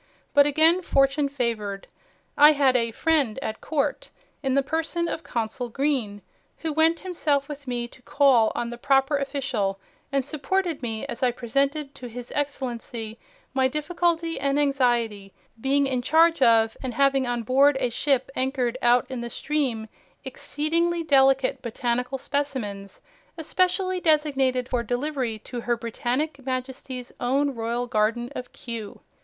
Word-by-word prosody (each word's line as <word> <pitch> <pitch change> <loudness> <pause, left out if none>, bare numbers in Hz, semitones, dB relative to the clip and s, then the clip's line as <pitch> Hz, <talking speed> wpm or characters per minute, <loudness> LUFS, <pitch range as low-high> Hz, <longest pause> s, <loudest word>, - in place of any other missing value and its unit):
But 285 0 +6
again 320 +5 +4
fortune 275 -2 +2
favored. 225 -7 -2 0.5
I 295 +1 +8
had 275 -3 +3
a 230 -2 +2
'friend 275 -2 +1
at 220 - -4
court' 300 - -2 0.3
in 270 -1 0
the 275 - +3
person 325 +4 -1
of 325 - -3
Consul 235 +1 -3
Green, 235 -6 -1 0.3
who 320 -2 -3
went 320 +2 +3
himself 300 -7 0
with 290 -2 -8
me 240 -1 -2
to 260 - -17
call 255 -4 +4
on 235 0 -2
the 240 - -8
proper 270 +3 +3
official, 260 -8 -2 0.3
and 275 -2 0
supported 320 +3 -1
me 225 -3 -3
as 235 - -6
I 255 - +4
presented 275 +4 -1
to 250 - -9
His 245 +1 -8
Excellency 240 -5 -4 0.3
'my 265 -1 +3
difficulty 330 +3 -1
and 280 +1 +1
anxiety, 240 -8 +1 0.3
being 275 +2 +2
in 260 -2 -1
charge 325 +4 +4
of, 225 -2 +4
and 255 -3 -4
having 275 -1 +3
on 240 -1 -1
board 270 +4 +4
a 250 -2 0
ship 270 +1 0
anchored 255 -1 -1
out 245 +1 +4
in 255 -2 -5
the 235 - -5
stream, 260 -6 -2 0.4
exceedingly 330 +6 -1
delicate 270 -3 +3
botanical 245 +3 -2
specimens, 245 -9 -4 0.4
especially 370 +3 0
designated 275 -6 +2
for 245 -2 0
delivery 245 0 -2
to 240 +3 -7
Her 240 0 0
Britannic 255 +5 -2
Majesty's 255 -1 -5
own 275 +3 +1
Royal 235 +1 -2
Garden 230 +1 0
of 250 - -6
Kew. 230 -4 -7
265 Hz, 150 wpm, -25 LUFS, 240-290 Hz, 0.5 s, I